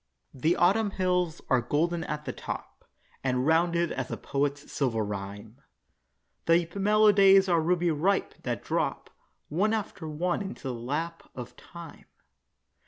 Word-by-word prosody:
The 155 +6 +1
Autumn 205 +5 +3
hills 180 -3 0
are 130 -2 +3
golden 165 +7 0
at 150 0 -4
the - - -3
top, - - -7 0.4
And 130 -1 0
rounded 170 +1 +2
as 130 -2 -3
a - - -4
poet's 140 +1 -2
silver 115 -6 0
rhyme; 105 +4 -7 0.9
The 165 0 +4
mellow 210 +2 +4
days 195 -1 +6
are 170 -3 +3
ruby 175 +1 +1
ripe, 180 +6 +1
that - - -3
drop - - -2 0.4
One 205 +8 +1
after 195 -6 -5
one 175 +6 -1
into 200 0 -7
the - - -2
lap 150 +8 -4
of 125 -1 -8
time. 170 +1 -12
165 Hz, 145 wpm, -28 LUFS, 135-180 Hz, 0.9 s, days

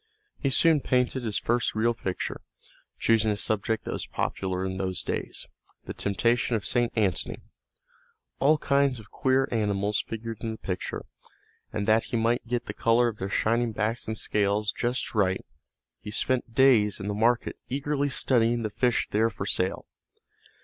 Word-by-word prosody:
He 140 - 0
soon 155 +4 +4
painted 125 0 +1
his 110 -3 -1
first 120 0 0
real 115 +2 +2
picture, 95 -5 -4 0.6
choosing 110 -1 +3
a 105 - 0
subject 110 +2 -1
that - - -3
was - - -4
popular 95 -1 -2
in 95 0 -3
those 95 -2 -2
days, - - -4 0.4
the - - -6
temptation 115 +4 +1
of 105 - -2
St. 120 -1 +1
Antony. 100 -7 0 1.0
All 150 +3 +4
kinds 140 -2 +2
of 105 - -15
queer 130 0 +2
animals 105 -2 0
figured 115 0 -6
in 115 - -3
the - - -8
picture, 90 -3 -4 0.7
and 100 0 -3
that 110 +1 +4
he 120 - -2
might 115 +1 +1
get 120 0 -1
the - - -5
colors 120 +1 +3
of 110 - -8
their 95 0 -3
shining 115 +3 +1
backs 110 +2 -2
and 110 0 -3
scales 105 0 +1
just 120 +4 -2
right 95 -4 +1 0.5
he - - -8
spent 120 +1 -1
days 120 -7 +5
in 95 - -5
the 105 - -1
market 115 +3 +1
eagerly 145 +1 -1
studying 120 -3 +2
the 110 - -2
fish 120 +3 +1
there 110 +2 +3
for 95 - -6
sale. 95 -2 -1
115 Hz, 170 wpm, -27 LUFS, 105-120 Hz, 1.0 s, days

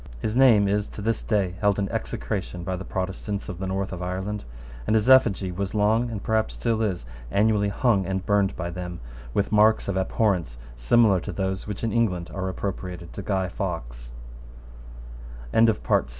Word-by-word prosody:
His 110 - -2
name 120 -6 +6
is, 105 +1 0
to - - -9
this 115 0 0
day, 100 -5 0
held 105 -2 +3
in 100 -1 0
execration 90 -3 -3
by 95 +1 -2
the 95 - -5
Protestants 95 +3 -4
of 90 -4 -6
the 95 - -3
North 95 +1 -2
of 90 - -6
Ireland; 95 +2 -3 0.4
and 110 - +3
his 110 +1 +2
effigy 110 -8 +5
was 100 +3 -4
long, 110 +3 +2
and 110 -3 -5
perhaps 110 -1 0
still 115 -2 0
is, 95 - -1 0.2
annually 105 - +2
hung 100 -3 +1
and 95 0 -2
burned 100 -2 +2
by 85 -1 -4
them 90 0 -6 0.4
with 100 - +1
marks 110 +1 +4
of 100 -1 -1
abhorrence 95 - 0 0.2
similar 100 - +4
to - - -6
those 95 0 -3
which 105 0 -5
in 115 - 0
England 90 -7 0
are 95 -1 -2
appropriated 90 -3 -5
t - - -5
100 Hz, 165 wpm, -25 LUFS, 95-110 Hz, 0.4 s, name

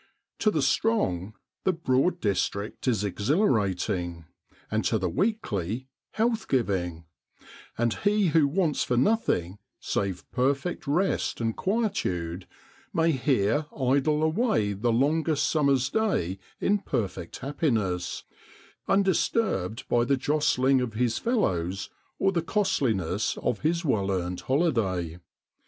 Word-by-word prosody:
To 215 - +3
the 155 -8 0
strong 120 - +1 0.3
the 190 - +3
Broad 165 +2 +1
district 100 +3 -2
is 110 -5 +2
exhilarating, 100 - 0 0.5
and 110 +1 +1
to 110 - +2
the 95 -3 -1
weakly 130 - -1 0.2
health 225 0 0
giving; 90 -9 -1 0.7
and 120 -1 +1
he 205 -2 +2
who 150 -2 +4
wants 160 0 +1
for 125 - 0
nothing, 110 - +1 0.2
save 95 -4 -2
perfect 140 +6 -1
rest 175 +7 0
and 115 -1 -1
quietude, 95 - -1 0.4
may 165 0 +2
here 130 0 +1
idle 140 +4 +2
away 160 - +1
the 110 +5 0
longest 150 +5 +2
summer's 140 -5 +2
day 100 - 0 0.2
in 205 +1 +2
perfect 95 - -3
happiness, 115 - -1 0.6
undisturbed 195 - +1
by 120 0 +3
the 135 +3 +2
jostling 135 -2 +2
of 115 -3 -3
his 120 0 +1
fellows 95 - -1 0.3
or 195 - +2
the 175 -3 0
costliness 115 - 0
of 115 - -1
his 170 +2 0
well 100 -8 +1
earned 90 -1 -2
holiday. 105 - 0
130 Hz, 120 wpm, -27 LUFS, 100-165 Hz, 0.7 s, who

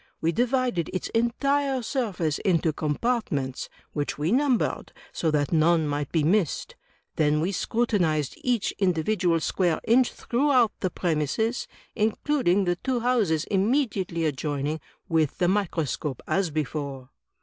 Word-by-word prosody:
We 165 - +1
divided 245 - 0
its 185 - -3
entire 270 +3 +1
stirface 190 - -1
into 165 -4 +1
compartments, 150 - -2 0.2
which 145 -1 -2
we 150 +4 0
ntunbered, 260 -1 +1 0.2
so 165 - 0
that 145 -2 0
none 160 0 +3
might 145 -1 -2
be 160 -3 +2
missed; 175 0 +1 0.4
then 150 -1 +3
we 170 +5 0
scrutinized 180 - 0
each 245 -4 +1
individual 180 -1 +1
square 175 0 0
inch 245 +2 +4
throughout 250 -2 +2
the 185 - 0
premises, 175 - -1 0.3
including 215 -3 +1
the 175 0 0
two 250 +4 -1
houses 215 -11 +2
inunediately 195 - +1
adjoining, 145 +1 -2 0.3
with 160 -5 +1
the 175 - +2
microscope, 165 -7 -1
as 195 -3 +1
before." 140 -3 -4
180 Hz, 125 wpm, -26 LUFS, 155-235 Hz, 0.4 s, inch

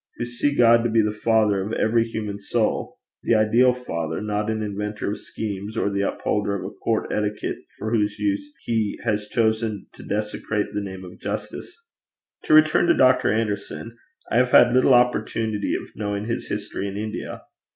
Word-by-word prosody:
who 120 - -2
see 120 +4 0
God 115 -2 +5
to 120 - +1
be 110 0 +3
the 105 - 0
father 105 -2 +2
of 105 +3 -5
every 115 +1 +2
human 105 -3 -5
soul 100 - -1 0.2
the 115 - +2
ideal 115 +4 +4
Father, 85 -11 -4
not 105 0 -2
an 110 -1 -1
inventor 105 0 -3
of 105 - -4
schemes, 105 0 -5
or 100 - +1
the 100 0 -1
upholder 100 0 -1
of 100 - -5
a - - -6
court - - -2
etiquette 105 0 -2 0.2
for 110 - -4
whose 105 -3 +1
use 105 +7 -1
he 110 -3 -1
has 105 -1 -1
chosen 110 -1 0
to - - -13
desecrate 105 0 -2
the 105 - -1
name 95 -1 -7
of 90 - -12
justice! 350 - -6 0.7
To - - +2
return 155 +2 +5
to 170 - +4
Dr. 130 -3 +4
Anderson. 110 +1 -3 0.4
I 115 - +2
have 125 0 +4
had 120 -1 +6
little 130 0 +5
opportunity 110 -3 +1
of - - -6
knowing 100 0 -3
his 115 +2 -3
history 100 -1 -3
in 100 0 -5
India. 110 +1 -5
110 Hz, 180 wpm, -23 LUFS, 105-115 Hz, 0.7 s, had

